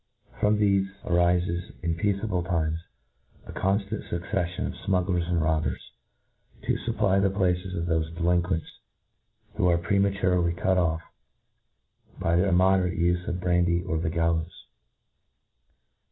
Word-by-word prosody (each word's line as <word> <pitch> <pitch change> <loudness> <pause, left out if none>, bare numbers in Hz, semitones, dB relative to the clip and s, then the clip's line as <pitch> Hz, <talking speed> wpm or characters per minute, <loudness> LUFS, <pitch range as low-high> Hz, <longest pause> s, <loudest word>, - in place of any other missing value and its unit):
From 105 0 +3
thefe 100 -2 +2 0.2
there - - -6
arifes, 85 0 +1
in 85 -1 0
peaceable 100 +2 -1
times, 80 -3 -1 0.7
a - - -9
conftant 100 +2 -1
fucceffion 90 +1 -2
of - - -6 0.2
fmuggler§ 90 -2 +1
and 85 -1 +1
robbers, 80 0 -1 0.7
to - - +1
fupply 100 -4 +2
the 100 - +3
places 90 -1 0
of 85 - -2
thofe 80 -2 0
delinquents 85 -1 0 0.8
who 90 - +2
are 85 -1 +4
prematurely 90 -1 +1
cut 95 +1 +1
off 80 -2 0 1.2
by 85 - +1
the 90 +3 +3
immoderate 95 -1 +3
ufe 85 +1 +1
of 90 - -2
brandy 85 -1 +2
or 90 -3 -2
of - - -2
the 80 - 0
gallows. 85 0 -1
90 Hz, 135 wpm, -26 LUFS, 85-95 Hz, 1.2 s, are